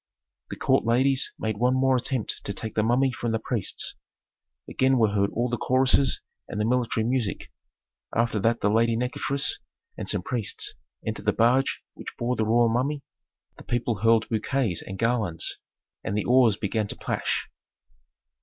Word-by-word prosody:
The - - -5
court - - +2
ladies 130 +4 +2
made 110 -2 -2
one 125 +3 +2
more 130 0 +3
attempt 125 -2 -2
to 100 - -1
take 110 +2 -5
the 110 - +2
mummy 125 +4 +3
from 120 -1 -3
the - - +2
priests; 110 -3 -3 0.7
again 130 0 +2
were 110 -3 +4
heard 100 -1 +2
all 120 +2 -1
the 120 -2 -2
choruses 130 +1 +3 0.3
and 105 - -5
the 105 - +1
military 120 -2 +1
music. 120 -4 -1 0.6
After 115 -2 +1
that 115 +3 +1
the 105 - +2
lady 115 +1 +3
Nikotris 135 +3 -1 0.4
and - - -4
some - - -1
priests 440 -2 -2 0.3
entered - - -4
the - - +3
barge 125 +4 +2
which - - -9
bore 120 +1 0
the 110 - 0
royal 120 +1 +4
mummy, 135 +5 0 0.5
the - - -12
people 120 -2 -1
hurled 115 +1 +4
bouquets 115 -3 0
and 95 - -7
garlands 115 -7 0 0.5
and 100 - -2
the 105 - -1
oars 120 -4 +5
began 105 +1 -1
to - - -4
plash. - - -2
120 Hz, 170 wpm, -26 LUFS, 110-130 Hz, 0.7 s, oars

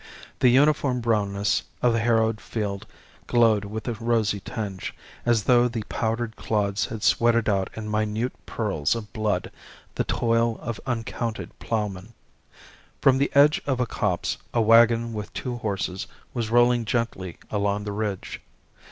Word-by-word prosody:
The 125 - +5
uniform 140 0 +3
brownness 105 -3 +1 0.2
of 120 -1 +4
the 115 - +1
harrowed 110 -1 +2
field 100 -3 -4 0.4
glowed 115 -4 +3
with 110 +3 -6
a 120 - 0
rosy 110 -2 0
tinge, 100 -4 -5 0.3
as 115 -3 +3
though 120 +1 +5
the 115 -3 -4
powdered 115 0 -2
clods 100 -2 0
had 110 -2 -6
sweated 115 -1 +3
out 95 -3 +1
in 110 -1 -5
minute 110 +3 -1
pearls 95 -7 0
of 105 -4 -7
blood 105 -4 -1 0.4
the - - 0
toil 115 0 +1
of 115 -2 -5
uncounted 115 -1 -3
ploughmen. 105 -1 -3 0.8
From 130 -1 +4
the 140 - +2
edge 145 +2 +6
of 130 -3 0
a 125 - +2
copse 100 -6 -1 0.2
a - - +4
waggon 115 +1 +5
with 105 -2 -5
two 125 -2 -3
horses 95 -4 -3 0.3
was 115 -2 -2
rolling 120 0 +4
gently 105 -5 -2
along 105 0 0
the 105 - -4
ridge. 100 -2 -4
110 Hz, 150 wpm, -25 LUFS, 105-120 Hz, 0.8 s, edge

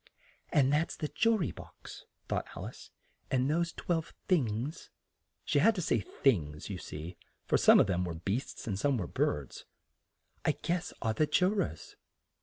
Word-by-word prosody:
"And 140 -1 +4
that's 155 +3 +1
the 150 - -3
ju 225 0 +3
ry 170 - -1
box," - - -12 0.2
thought - - -1
Al - - -5
ice, - - -10 0.4
"and 130 0 +2
those 170 +3 +1
twelve 165 -2 -2
things" 130 - 0 0.6
(she - - +2
had 225 +9 +5
to 185 - -1
say 120 - +2
"things," 85 - 0
you 95 - -4
see, 80 +3 -7 0.3
for - - +2
some - - +7
of - - +6
them 90 -2 0
were 85 -2 -3
beasts 100 +10 -3
and 100 -4 -2
some 140 +2 +2
were 95 - -2
birds), 75 -4 -2 0.8
"I - - +3
guess 175 0 -2
are 110 - +1
the 155 +6 +2
ju 180 +4 +3
rors." 185 - -3
130 Hz, 175 wpm, -31 LUFS, -, 0.8 s, some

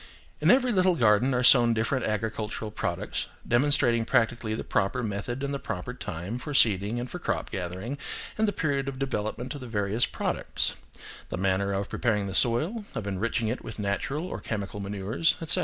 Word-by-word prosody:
In - - +3
every 255 0 +5
little 185 -3 +4
garden 115 0 +4
are 125 - +1
sown 120 -2 +7
different 115 +4 0
agricultural 110 0 -2
products, - - -2 0.2
demonstrating 120 -2 +3
practically 115 -2 +1
the - - -4
proper 110 +6 0
method 110 +5 -3
and 140 0 -1
the 140 - -2
proper 90 -8 -4
time 90 +9 -5
for 145 +2 -5
seeding 105 0 +3
and 120 - -3
for 180 - -6
crop - - -2
gathering, 95 +9 -4 0.4
and 220 0 +2
the - - +2
period 140 -7 -1
of 135 - -6
development 125 -1 -2
of 145 - -8
the 125 - -7
various 105 +1 +1
products; - - -1 0.6
the - - -3
manner 95 +1 +1
of 100 0 -1
preparing 105 -4 0
the 95 - -4
soil, 155 - +1
of 110 - -3
enriching 110 +4 -1
it 120 +4 -2
with 110 - -7
natural 105 - -1
or - - -5
chemical 100 -2 -4
manures, 100 +10 0
etc. 160 -4 +3
115 Hz, 185 wpm, -28 LUFS, 100-135 Hz, 0.6 s, sown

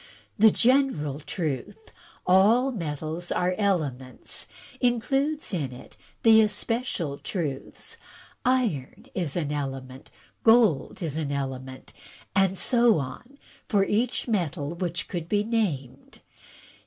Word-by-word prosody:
The 220 +1 +7
general 230 - +2
truth, 150 -2 -4 0.5
*A11 225 +8 +4
metals 160 0 -4
are 180 +1 +1
elements,' 145 - -2 0.3
includes 270 +4 0
in 145 -8 -1
it 125 - -12 0.3
the 220 -1 +8
especial 210 - -1
truths, 150 -8 -5 0.5
*Iron 235 - 0
is 170 -7 -1
an 150 -4 -1
element,' 135 -2 -5 0.3
*Gold 225 - +4
is 155 -2 -2
an 150 -3 -2
Element,' 130 -2 -5 0.4
and 195 -1 +3
so 240 -2 +5
on 240 - -6 0.3
for 200 -3 +3
each 235 +6 0
metal 170 - -1
which 175 0 -3
could 170 -2 -5
be 205 -1 +2
named. 200 - -3
180 Hz, 110 wpm, -26 LUFS, 145-225 Hz, 0.5 s, the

